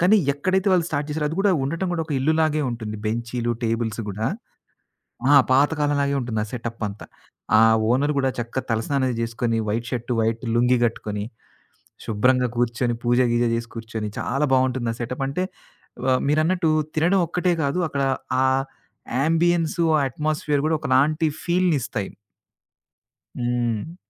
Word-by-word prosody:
కానీ 185 +5 +5 0.2
ఎక్కడైతే 185 +7 0
వాళ్ళు 180 -2 +3
స్టార్ట్ 145 -1 -2
జేసారో 150 0 -1
అది 160 - -5
గూడా 200 0 +3
ఉండటం 165 +7 -2
గూడా 165 -2 -1
ఒక 155 - -4
ఇల్లు 140 +4 +2
లాగే 155 -1 +2
ఉంటుంది 110 -2 -5
బెంచీలు, 120 +2 -2
టేబుల్స్ 115 -1 -1
గూడా. 105 +3 -2 1.1
ఆ! - - +8 0.2
పాతకాలం 145 +2 +3
లాగే 140 0 0
ఉంటుంది 115 -3 -3
ఆ - - -4
సెటపంతా. 115 -4 -5 0.5
ఆ - - +6 0.3
ఓనర్ 140 +5 +2
గూడా 135 -1 +2
చక్కగా 120 +2 -3
తలస్నానం 130 +5 0
అది 125 - -2
చేసుకొని 115 0 -1
వైట్ 115 +3 -2
షర్టు 120 0 -2
వైట్ 115 +1 0
లుంగీ 125 +1 +4
గట్టుకొని 105 -3 -3 0.8
శుభ్రంగా 125 +4 +2
కూర్చొని 120 0 0
పూజ 120 0 +2
గిజ 120 0 +2
చేసి 115 0 -3
కూర్చొని 115 -2 -5
చాలా 140 +2 -1
బావుంటుంది 130 -2 +2
ఆ - - -12
సెటప్. 125 +3 -4
అంటే 165 +7 -1 0.6
వ 130 -1 +3
మీరు 150 +2 +3
అన్నట్టు 175 -1 +1 0.2
తినడం 170 +5 +3
ఒక్కటే 180 +2 0
గాదు 140 +4 0
అక్కడ 140 -2 -2 0.4
ఆ - - +3 0.8
యాంబియన్సు 165 +1 +2
ఆ - - +2
అట్మాస్ఫియర్ 150 +1 -1
గూడా 160 - +2
ఒకలాంటి 150 +5 +2 0.2
ఫీల్‌నిస్తాయి. 160 - 0 1.3
హ్మ్. 120 +4 -1
130 Hz, 150 wpm, -23 LUFS, 115-155 Hz, 1.3 s, ఆ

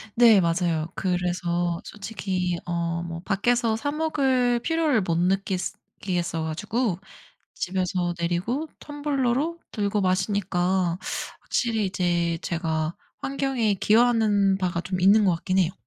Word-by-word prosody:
네 230 -4 +7
맞아요. 165 -2 0
그래서 175 -1 -1
솔직히 190 -4 -3
어 170 -1 -1
뭐 165 -1 -6
밖에서 225 +4 +1
사 285 +6 -2
먹을 265 -6 +1
필요를 310 -3 +1
못 170 -3 0
느끼스 190 +1 0 0.2
끼겠어 175 -4 -1
가지고 200 +5 -1 0.5
집에서 180 -1 -1
내리고 180 - -1
텀블러로 290 +2 -1
들고 205 -1 0
마시니까 185 -2 +1 0.4
확실히 225 -3 0
이제 175 -3 0
제가 160 -1 -2 0.2
환경에 270 -6 0
기여하는 210 -2 +3
바가 180 -3 -1
좀 185 +1 -3
있는 205 +3 +6
것 180 -3 +3
같긴 185 +3 -1
해요. 175 -2 +2
190 Hz, 270 characters per minute, -25 LUFS, 175-235 Hz, 0.5 s, 네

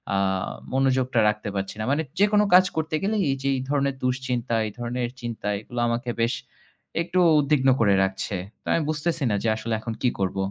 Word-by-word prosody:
আ - - +2 0.6
মনোযোগটা 130 -2 +2
রাখতে 105 0 -3
পারছি 95 0 -3
না। - - -1
মানে 145 - +2 0.2
যেকোনো 210 +1 +4
কাজ 185 +1 +8
করতে 160 0 -1
গেলেই 210 0 +1
এই - - 0
যে, 140 - +1
এই 130 - -2
ধরনের 140 -1 +1
দুশ্চিন্তা, 125 -2 -1
এই - - -6
ধরনের 120 0 -2
চিন্তা 115 -3 -5
এগুলো 120 +2 -7
আমাকে 120 +1 -2
বেশ 115 +2 +2 0.7
একটু 175 +2 0 0.2
উদ্বিগ্ন 140 -2 +3
করে 100 -3 +4
রাখছে। 95 +1 -2 0.3
তো - - -49
আমি 165 - +2
বুঝতেছি 155 +1 -1
না - - +2
যে 115 - +2
আসলে 115 +1 -3
এখন 115 +1 -5
কি 125 - +3
করব। 95 0 -1
125 Hz, 195 wpm, -25 LUFS, 115-150 Hz, 0.7 s, কাজ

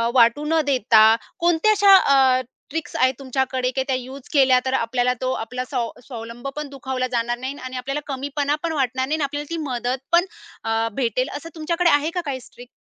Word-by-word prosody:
वाटू 240 +4 +4
न 320 +1 +2
देता 225 -5 +5 0.2
कोणत्या 345 +4 +3
अशा 405 -2 +7
अ, 265 -5 +4 0.3
ट्रिक्स 310 0 -5
आहेत 255 0 +3
तुमच्याकडे, 260 -1 -1
की 265 +1 -1
त्या 265 - +1
यूज 260 +1 -8
केल्यातर 260 -2 +4
आपल्याला 250 0 +1
तो 255 0 0
आपला 250 +2 -4
स्वाव 250 -3 -2 0.2
स्वावलंब 235 0 -8
पण 300 -1 -5
दुखावला 265 -2 -3
जाणार 240 0 -1
नाही 260 +2 -4
आणि 255 0 -6
आपल्याला 275 +4 -3
कमीपणा 285 +1 -1
पण 335 - -1
वाटणार 260 -2 0
नाही 305 - 0
आणि 310 - -1
आपल्याला 290 +1 -4
ती 335 - -3
मदत 245 +1 -2
पण 345 +1 +5 0.4
अ, 225 0 0
भेटेल 255 +2 -1
असं 330 +3 -9
तुमच्याकडे 335 +2 +1
आहे 290 +1 +3
का 355 - 0
काही 270 -3 -3
ट्रिक? 245 0 -14
265 Hz, 190 wpm, -22 LUFS, 250-295 Hz, 0.4 s, अशा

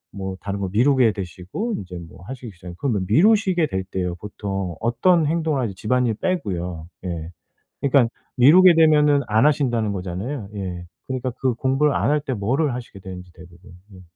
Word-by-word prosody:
뭐 95 -1 -5
다른 100 0 -4
거 95 -1 -2
미루게 125 +1 +4
되시고 95 - -5
이제 90 -1 -8
뭐 90 +2 -15
하시기 130 -3 -7
시작 90 -1 -10
그러면 110 -7 -1
미루시게 190 - +4
될 95 -9 -3
때요. 90 -2 -3
보통 100 -3 -4
어떤 160 +9 +2
행동을 160 -2 0
하지 105 -5 -2
집안일 120 +4 0
빼고요. 90 - -3 0.2
예. 85 -1 -4 0.5
그러니까 135 -4 +3 0.3
미루게 170 +8 +7
되면은 150 -3 +5
안 110 +4 +3
하신다는 120 -8 +1
거잖아요? 100 +6 -5
예. 90 -3 -5 0.2
그러니까 130 -1 -3
그 130 -3 +1
공부를 135 +4 +1
안 - - +1
할 150 - +2
때 140 -2 -3
뭐를 125 +7 0
하시게 120 -5 -8
되는지 90 -1 -9
대부분? 90 +1 -16 0.2
음. 95 - -13
115 Hz, 370 characters per minute, -22 LUFS, 95-145 Hz, 0.5 s, 미루게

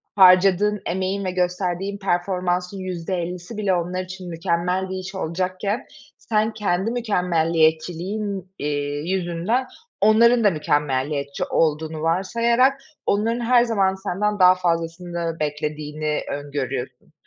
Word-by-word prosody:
harcadığın 190 +2 +5
emeğin 190 +2 -1
ve 185 - -1
gösterdiğin 180 +2 -1
performansın 180 0 -1
%50'si 180 +2 -4
bile 205 -3 +1
onlar 180 +1 -1
için 185 0 -8
mükemmel 175 +2 -1
bir 190 - -4
iş 185 +1 -7
olacakken 185 +5 -2 0.3
sen 220 0 0
kendi 200 0 0
mükemmeliyetçiliğin, 180 -1 0
eee, 145 0 -2
yüzünden 190 +7 0 0.3
onların 230 +3 +5
da 205 - +6
mükemmeliyetçi 145 -3 -1
olduğunu 155 0 0
varsayarak 235 - +2 0.2
onların 225 +4 +1
her 240 0 +4
zaman 200 -5 +1
senden 205 +2 -2
daha 185 0 +7
fazlasını 170 -1 -2
beklediğini 150 0 -2
öngörüyorsun. 135 -3 -5
180 Hz, 110 wpm, -22 LUFS, 165-200 Hz, 0.3 s, daha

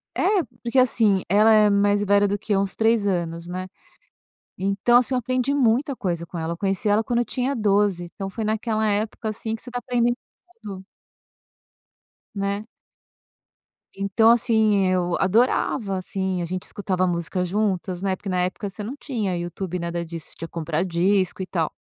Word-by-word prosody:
É, - - 0 0.4
porque 240 +2 0
assim, 220 -6 +3
ela 210 +4 +5
é 215 -1 +6
mais 205 0 +3
velha 205 0 +4
do 205 +1 -1
que 210 0 -1
uns 195 0 0
3 225 -2 +2
anos, 170 -3 -2
né. 185 +1 -4 0.9
Então 200 +5 +3
assim, 250 +1 0
eu - - +2
aprendi 255 +2 0
muita 265 +1 +2
coisa 175 -7 -2
com 170 +1 -8
ela, 165 +1 -2
eu - - -5
conheci 195 +2 -1
ela 205 +2 +3
quando 235 +1 -1
eu 240 - +2
tinha 255 +4 -2
12, 205 -4 +2
então 195 -1 -5
foi 220 +3 -4
naquela 220 0 0
época, 215 +1 -1
assim, 220 +1 -4
que - - -13
você 250 - -8
está 245 - -3
aprendendo 240 -1 +1 0.5
tudo. 195 -3 -7 1.5
Né. 200 +1 -2 1.3
Então 200 +3 +3
assim, 220 -4 +3
eu 180 -1 +1
adorava, 205 0 +1
assim, 190 0 -2
a 170 - -2
gente 185 +2 -4
escutava 185 -2 -1
música 175 +1 -1
juntas, 185 -2 -1
né, 190 -1 0
porque 200 - -9
na 180 -1 0
época 185 +3 -3
você 210 - -7
não 235 +7 -5
tinha 220 -11 -2
YouTube, 175 +1 -4
nada 170 0 -3
disso, 165 -1 -7
você - - -10
tinha 165 - -6
que - - -37
comprar 165 -1 -1
disco, 185 +1 +1
e - - -4
tal. 165 -4 -1
200 Hz, 180 wpm, -23 LUFS, 185-220 Hz, 1.5 s, é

